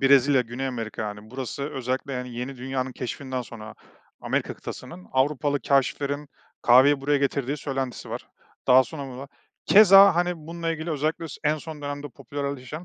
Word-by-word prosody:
Brezilya, 135 0 +5
Güney 125 +3 -4
Amerika, 115 -4 -4
yani, 105 0 -7
burası 130 +2 -5
özellikle, 130 -1 -3
yani, 125 -1 -5
Yeni 125 +3 -5
Dünya'nın 130 +1 -3
keşfinden 130 +1 -4
sonra 110 -2 -10 0.5
Amerika - - -1
kıtasının, 90 0 -9
Avrupalı 145 +1 +1
kâşiflerin 140 +1 0 0.3
kahveyi 130 +4 +6
buraya 145 +1 +2
getirdiği 140 0 -1
söylentisi 135 -3 -4
var. - - -6 0.4
Daha 130 +1 +7
sonra 140 -4 -7
burda 135 +2 -8 0.4
keza 195 -2 +8
hani, 175 +1 +1
bununla 165 +1 -4
ilgili 160 +1 -4
özellikle 155 +2 -1
s - - -8
en 150 +1 +3
son 155 -1 -9
dönemde 145 0 -5
popülerleşen, 140 +3 -6
135 Hz, 155 wpm, -25 LUFS, 125-145 Hz, 0.5 s, keza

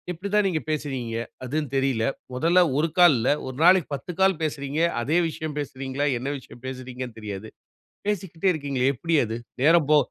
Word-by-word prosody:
இப்படி 180 +3 -4
தான் 210 -1 +4
நீங்க 165 -5 -1
பேசுவீங்க? 135 -7 -3 0.3
அதுந்தெரியல. 135 -3 0 0.3
மொதல்ல 165 +8 +3 0.2
1 155 +3 +2
கால் 175 -5 +7
இல்ல, 115 +2 +1 0.2
ஒரு 130 - -6
நாளைக்கு 180 0 +6
10 140 - -7
கால் 190 -3 +3
பேசுறீங்க. 145 -1 -2 0.2
அதே 150 +8 +1
விஷயம் 155 -1 -5
பேசுறீங்களா? 135 0 -3
என்ன 130 +3 -3
விஷயம் 125 -2 -14
பேசுறீங்கன்னு 130 -2 -6
தெரியாது. 105 0 -6 0.6
பேசிக்கிட்டே 190 -3 0
இருக்கீங்களே 140 -4 0
எப்படி 165 +7 -1
அது? 110 +1 -4 0.3
நேரம் 160 0 +5
போ 150 - +7
145 Hz, 160 wpm, -25 LUFS, 130-165 Hz, 0.6 s, கால்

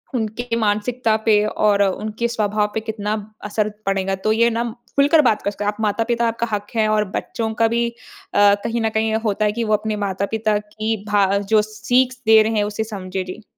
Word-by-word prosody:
उनके 230 +1 -2
मानसिकता 220 +2 +1
पे 210 -2 +4
और 210 -1 +2
उनके 215 +4 -1
स्वभाव 210 -2 0
पे - - 0
कितना 215 -1 -3 0.3
असर 210 +1 -1 0.2
पड़ेगा। 195 0 0
तो 215 - +3
ये 235 +2 +4
नम 235 0 -2 0.2
खुलकर 290 +3 +5
बात 220 -5 +2
कर 200 - -1
सकते, 205 0 -5
आप 205 0 -1
माता-पिता, 230 +3 0
आपका 230 +1 -2
हक 205 0 -2
है 220 -1 +2
और 215 0 +2
बच्चों 225 -1 -3
का 225 - +6
भी 235 +1 0
अ, 235 - -15 0.7
कहीं 230 0 -1
न 225 - +1
कहीं 220 0 0
होता 210 0 +1
है 210 - +2
कि 230 +2 -2
वो 215 -1 0
अपने 215 0 0
माता-पिता 210 +3 -1
की 215 +1 -3
भा 205 -1 +3
जो 210 +2 +2
सीख 245 +4 +1
दे 220 0 +7
रहे 220 - -1
हैं 205 - +2
उसे 210 +1 -2
समझे, 190 -3 -5
जी। 185 +4 -9
215 Hz, 205 wpm, -20 LUFS, 210-225 Hz, 0.7 s, दे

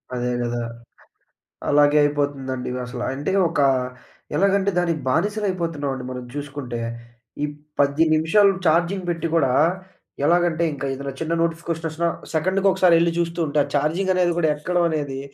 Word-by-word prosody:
అదే 125 0 -1
కదా! 120 0 -2 1.1
అలాగే 145 0 +5
అయిపోతుందండి. 140 -3 -1 0.2
అసలు 125 0 -6
అంటే 145 +7 -3 0.2
ఒక 165 - -3 0.8
ఎలాగంటే 200 +1 +2
దానికి 170 -3 0
బానిసలు 205 +9 0
అయిపోతున్నామండి 145 -7 -3
మనం 125 -1 -6
చూసుకుంటే. 140 -4 -5 0.6
ఈ - - +3 0.3
10 145 +3 +3
నిమిషాలు 195 +6 +4 0.2
చార్జింగ్ 175 +4 +2
పెట్టి 165 -1 -1
కూడా 135 -6 +3 0.7
ఎలాగంటే, 170 0 +2
ఇంకా 140 0 -5
ఏదైనా 140 0 -5
చిన్న 165 +1 -1
నోటిఫికేషన్ 165 0 -2
వచ్చినా 170 +2 -1 0.3
సెకండ్‌కి 190 +5 +1
ఒకసారి 185 -2 +4
వెళ్లి 170 0 +3
చూస్తుంటే, 165 -3 0
ఆ - - -7
చార్జింగ్ 165 +7 +1
అనేది 180 -1 +2
కూడా 160 -3 +2
ఎక్కడం 175 +3 0
అనేది, 145 -4 -3
160 Hz, 135 wpm, -22 LUFS, 140-175 Hz, 1.1 s, అలాగే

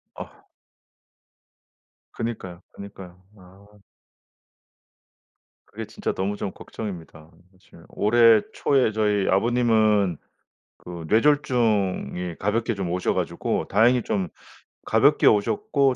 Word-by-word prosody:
아. - - -12 1.6
그니까요, 95 -6 -6
그니까요. 95 -3 -11 0.2
아. 100 +3 -19 1.9
그게 - - -8
진짜 - - -4
너무 100 +2 -2
좀 95 - -4
걱정입니다. 85 -7 -9 0.2
사실 95 0 -20
올해 115 0 +4
초에 130 -5 +1
저희 105 -2 0
아버님은 110 -4 +2 0.6
그 85 -2 -9
뇌졸중이 110 - +1
가볍게 115 +3 -1
좀 95 -3 -4
오셔 90 +1 -1
가지고 - - -2
다행히 115 +4 +3
좀 95 -4 -2 0.6
가볍게 - - +3
오셨고 140 - +2
105 Hz, 220 characters per minute, -24 LUFS, 95-115 Hz, 1.9 s, 올해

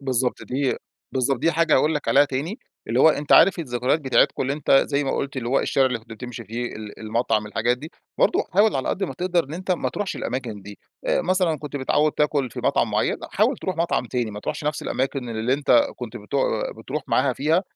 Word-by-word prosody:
بالضبط 130 -2 -1
دي 135 +1 -1 0.4
بالضبط، 130 0 +1
دي 165 +7 +2
حاجة 165 0 +3
هاقول 150 +4 +3
لك 150 - -3
عليها 145 +1 +6
تاني، 145 - -4 0.3
اللي 120 +3 +2
هو 160 - +8
أنت 150 -1 +1
عارف 185 +2 +6
الذكريات 125 0 0
بتاعتكم 135 -1 +2
اللي 135 - -1
أنت 145 0 -4 0.2
زي 145 0 0
ما 135 - -1
قلت 140 0 -3
اللي 120 -2 -3
هو 135 - +3
الشارع 135 -1 +2
اللي 125 -3 -1
كنت 115 +1 -23
بتمشي 115 +1 -8
فيه، 120 +4 -4
ال 105 -1 -9
المطعم 110 -1 0
الحاجات 120 +3 0
دي، 155 +4 -9 0.3
برضه 435 -5 +3
حاول 205 +1 +4
على 130 - -2
قدّ 195 - 0
ما - - -5
تقدر 175 -2 0
إن 145 - -8
أنت 185 +2 -5
ما 180 - +1
تروحش 205 -2 -4
الأماكن 120 -5 -4
دي، 100 0 -11 0.3
آآ - - +2
مثلًا 180 -4 +1
كنت 145 0 -6
متعود 145 +3 +2
تاكل 145 -4 0
في - - -6
مطعم - - +2
مُعَيّن، - - +1
حاول - - +2
تروح 185 - -4
مطعم 170 -5 0
تاني، 120 -2 -2
ما 105 - -7
تروحش 150 - -4
نفس 150 0 -1
الأماكن 130 -1 -2
اللي 115 +2 -1
أنت 135 -4 +4
كنت 120 -1 -7
بت 105 +5 -10 0.4
بتروح 140 +7 -4
معاها 130 0 +2
فيها، 160 +8 +1
135 Hz, 225 wpm, -23 LUFS, 120-155 Hz, 0.4 s, هو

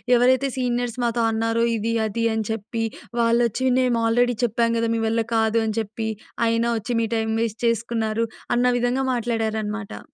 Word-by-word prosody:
ఎవరైతే 260 +3 +4
సీనియర్స్ 245 -1 -1
మాతో 235 0 +1
అన్నారో 225 +1 0
ఇది 230 +2 -1
అది 230 +2 -1
అని 220 -1 -1
చెప్పి, 225 +1 -3 0.4
వాళ్ళొచ్చి 235 +2 +2
మేము 245 -2 +2
ఆల్రెడీ 245 +1 +2
చెప్పాం 230 +1 +1
కదా! 230 0 0
మీ 225 - -1
వల్ల 225 +1 +1
కాదు 220 0 +2
అని 215 - -2
చెప్పి, 220 +1 -5 0.4
అయినా 230 +1 +1
వచ్చి 230 +3 -5
మీ 225 - 0
టైమ్ 220 0 -1
వేస్ట్ 225 -1 -3
చేసుకున్నారు! 230 -1 0 0.3
అన్న 245 +1 +2
విధంగా 250 +2 0
మాట్లాడారనమాట. 220 -2 -2
230 Hz, 160 wpm, -23 LUFS, 220-240 Hz, 0.4 s, ఎవరైతే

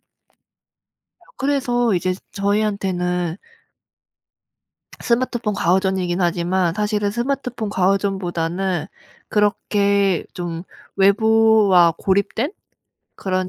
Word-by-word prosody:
맞아요. - - -56 1.2
그래서 250 -5 +1
이제 185 +1 0 0.2
저희한테는 195 -4 -1 1.6
스마트폰 235 -3 0
과의존이긴 190 -1 0
하지만 175 0 0
사실은 210 0 0
스마트폰 240 -1 -3
과의존보다는 185 -3 -1 0.4
그렇게 200 -3 +1
좀 170 -1 -5 0.3
외부와 205 -3 +4
고립된 200 - 0 0.6
그런 185 -1 -2
195 Hz, 225 characters per minute, -20 LUFS, 180-215 Hz, 1.6 s, 외부와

